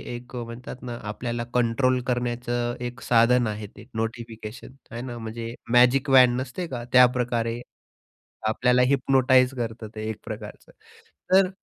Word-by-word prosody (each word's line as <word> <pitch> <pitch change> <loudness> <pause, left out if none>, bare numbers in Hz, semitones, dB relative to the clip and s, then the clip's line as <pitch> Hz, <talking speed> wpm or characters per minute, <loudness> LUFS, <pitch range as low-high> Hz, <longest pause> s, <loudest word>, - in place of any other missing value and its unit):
एक 120 +1 -10
म्हणतात 120 +1 -7
ना, 120 -1 -5
आपल्याला 120 +3 -4
कंट्रोल 125 +1 +2
करण्याचं 120 -1 -1
एक 125 +2 -7
साधन 120 0 +4
आहे 105 -1 -4
ते, 105 +2 -15
नोटिफिकेशन. 115 +1 -5 0.2
आहे 120 - -5
ना. 120 -1 -6
म्हणजे 115 +1 -6 0.2
मॅजिक 125 +3 +5
वॅन 125 -2 +7
नसते 150 +7 -5
का, 120 -4 -5
त्याप्रकारे 120 -2 +3 0.9
आपल्याला 125 +3 +3
हिप्नोटाइज 130 -1 +3
करतं 115 -2 -4
ते 110 0 -4
एक 110 - -4
प्रकारचं - - -8 0.6
तर 190 0 +6
120 Hz, 135 wpm, -25 LUFS, 115-125 Hz, 0.9 s, वॅन